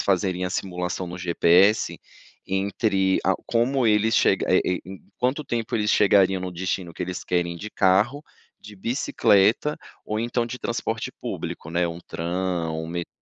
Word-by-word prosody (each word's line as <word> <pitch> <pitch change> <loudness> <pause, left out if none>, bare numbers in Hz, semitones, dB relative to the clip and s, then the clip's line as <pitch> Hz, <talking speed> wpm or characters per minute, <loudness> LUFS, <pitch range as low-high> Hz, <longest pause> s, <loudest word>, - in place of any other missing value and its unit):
fazerem 95 -1 0
a 90 - -2
simulação 90 -1 -3
no 90 +1 -7
GPS 90 +4 +3 0.5
entre 95 0 +1
a - - +3
como 120 +2 +1
eles 110 +1 +3
che - - +5 0.2
eh, 95 - +4 0.2
em 95 +1 -10 0.2
quanto 130 +5 0
tempo 115 -4 -3
eles 105 -2 +1
chegariam 95 -2 +4
no 90 - -4
destino 90 0 -3
que - - -4
eles 90 0 -4
querem 85 -1 -1
de 105 +5 -7
carro, 105 +10 +2 0.3
de 105 0 -12
bicicleta 110 +3 +2 0.3
ou 105 0 -2
então 120 +1 0
de 125 +1 -6
transporte 115 -1 -3
público, 75 - -5
né. 85 +1 +1
Um 85 +1 -7
tram, 85 -2 -3
um 80 - -5
metrô. 85 +1 -4
95 Hz, 160 wpm, -24 LUFS, 90-110 Hz, 0.5 s, che